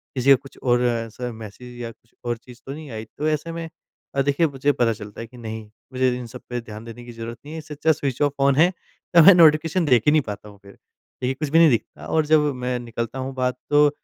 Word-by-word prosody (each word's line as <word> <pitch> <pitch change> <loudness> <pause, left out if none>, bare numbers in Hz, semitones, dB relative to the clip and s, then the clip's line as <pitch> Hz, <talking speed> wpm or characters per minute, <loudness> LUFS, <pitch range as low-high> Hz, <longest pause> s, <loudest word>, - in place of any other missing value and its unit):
किसी 130 +2 +1
का 135 - +10
कुछ 135 +2 -12
और 120 -1 +3
ऐसा 120 +1 -2
मैसेज 115 +3 -10
या 115 -1 -5
कुछ 115 - -26
और 120 -1 -1
चीज़ 120 +1 -15
तो 135 - -5
नहीं 150 -2 -9
आई? 110 0 -6
तो 150 +2 -1
ऐसे 155 +2 -2
में 165 -1 -5 0.5
अ, 135 - +3
देखिए 145 +4 +2
मुझे 140 +1 +1
पता 120 -4 +1
चलता 105 +1 -9
है 115 - -7
कि 125 +2 -16
नहीं, 110 -1 -6 0.3
मुझे 130 0 +2
इन 125 - -6
सब - - -10
पे 120 -1 -3
ध्यान 110 0 -10
देने 120 +1 -9
की 120 - -9
ज़रूरत 115 +1 -7
नहीं 155 - -8
है - - -5
इससे 155 -1 -9
अच्छा 160 +2 +2
स्विच 140 -3 -2
ऑफ 145 -1 +3
फ़ोन 140 -1 +3
है 165 +5 +5 0.5
तो 170 - +10
मैं 195 - +10
नोटिफ़िकेशन 165 +1 +5
देख 125 -6 +4
ही 150 - +6
नहीं 155 -1 +4
पाता 105 -2 -7
हूँ 100 -1 -16
फिर। 100 - -13
देखिए 130 +1 -7
कुछ 150 +1 -4
भी 165 +3 +5
नहीं 165 -2 +7
दिखता 115 - -2
और 160 -1 +1
जब 155 0 +5 0.2
मैं 125 0 0
निकलता 115 +1 -5
हूँ 130 +1 -4
बाहर 125 0 0 0.2
तो 145 0 +6
130 Hz, 260 wpm, -23 LUFS, 115-150 Hz, 0.5 s, का